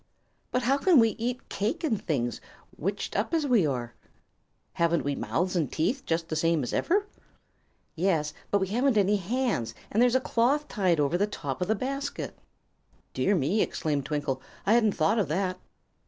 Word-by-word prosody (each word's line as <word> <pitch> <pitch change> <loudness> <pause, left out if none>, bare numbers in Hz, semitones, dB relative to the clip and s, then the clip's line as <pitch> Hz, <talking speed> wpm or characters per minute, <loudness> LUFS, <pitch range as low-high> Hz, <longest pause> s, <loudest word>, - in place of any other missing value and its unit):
"But 250 - 0
how 270 +4 +2
can 355 +1 +5
we 225 -2 +6
eat 245 +2 -3
cake 225 - -2
and 225 -10 0
things, 120 -8 -1 0.3
witched 195 +5 -3
up 220 - 0
as 315 -2 +1
we 235 - +3
are?" 120 -4 -3 0.8
"Haven't 170 0 +1
we 145 - -1
mouths 180 +6 -1
and 160 -7 0
teeth, 235 - -1
just 165 0 0
the 155 - -3
same 165 -1 +2
as 120 - -4
ever?" 400 +4 +1 0.9
"Yes, 160 -4 +1 0.2
but 200 - +2
we 190 -1 -1
haven't 245 +3 +2
any 205 +1 +3
hands, 210 - -1 0.2
and 220 - +2
there's 245 0 +4
a - - +5
cloth 260 +5 +1
tied 185 - +1
over 150 +5 +1
the 205 - +2
top 145 -8 -5
of 180 - 0
the 220 - +2
basket." 275 +5 -4 0.8
"Dear 200 - +2
me!" 180 +7 +1
exclaimed 145 -3 -1
Twinkle; 145 -3 -2 0.2
"I 210 - +4
hadn't 220 -3 +4
thought 165 +8 +2
of 195 - +1
that." 185 +4 -1
195 Hz, 185 wpm, -28 LUFS, 160-240 Hz, 0.9 s, we